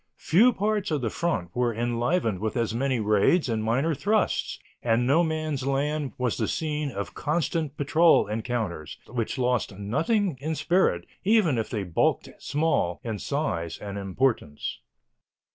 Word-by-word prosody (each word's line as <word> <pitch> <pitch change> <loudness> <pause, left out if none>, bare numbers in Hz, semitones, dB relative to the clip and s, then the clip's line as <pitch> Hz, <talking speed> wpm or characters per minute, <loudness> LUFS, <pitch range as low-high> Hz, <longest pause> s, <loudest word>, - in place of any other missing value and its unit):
Few 215 - +4
parts 210 -2 -1
of 150 -4 0
the 115 - -1
front 110 - -2
were 120 -2 +1
enlivened 120 - 0
with 110 +4 -2
as 115 -2 0
many 130 +1 0
raids 110 - +3
and 110 -2 -1
minor 130 +9 +1
thrusts, 210 +9 0 0.2
and 120 +1 +2
No 150 +7 +4
Man's 155 -3 -2
Land 145 +1 -1
was 125 -3 -1
the - - 0
scene 150 -2 -2
of 100 -5 -5
constant 155 -1 -1
patrol 160 +4 +4
encounters, 110 - -3
which 115 0 -3
lost 125 -5 0
nothing 165 - 0
in 160 +2 -2
spirit, 180 +4 +1 0.2
even 195 - +3
if 110 - -3
they 105 -5 -2
bulked 90 -3 0
small 145 - 0
in 110 -3 -4
size 85 - -2
and 100 -1 -7
importance. 100 - -1
130 Hz, 150 wpm, -26 LUFS, 110-160 Hz, 0.2 s, Few